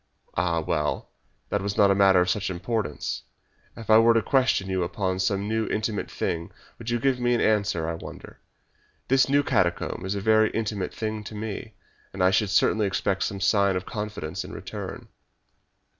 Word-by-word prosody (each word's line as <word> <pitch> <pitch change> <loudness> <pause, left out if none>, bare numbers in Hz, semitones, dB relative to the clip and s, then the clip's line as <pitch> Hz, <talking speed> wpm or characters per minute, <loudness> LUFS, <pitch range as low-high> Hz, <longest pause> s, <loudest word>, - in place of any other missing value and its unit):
"Ah, 85 -1 +1
well, 75 -1 -2 0.4
that 105 - 0
was 100 +1 -3
not 100 -1 +6
a - - +5
matter 95 -2 +5
of 90 0 +2
much 105 -2 -3
importance. 95 -1 -3 0.6
If 115 - -9
I 110 - +8
were 115 +1 +5
to 115 - +3
question 130 -8 +2
you 95 -1 -1
upon 95 +1 -1
some 100 +2 0
intimate 110 -1 -1
thing 85 +1 -3 0.3
would 115 0 -6
you 120 - +1
give 130 +1 +1
me 120 0 +2
an - - 0
answer, 100 -7 +1
I 85 - -1
wonder! 80 - -10 0.7
This 130 0 +4
new 145 +1 +4
catacomb 95 -9 0
is 95 +2 -2
a - - -1
very 110 +1 +4
intimate 105 -4 -2
thing 110 -1 -4
to 105 - -8
me, 110 0 -6 0.4
and 95 -1 -1
I 95 - +5
should 100 +1 +2
certainly 105 +2 +3
expect 95 0 -1
some 100 -3 -2
sign 100 +1 +3
of 90 0 -3
confidence 105 -8 -5
in - - -9
return." - - -7
100 Hz, 185 wpm, -26 LUFS, 95-110 Hz, 0.7 s, I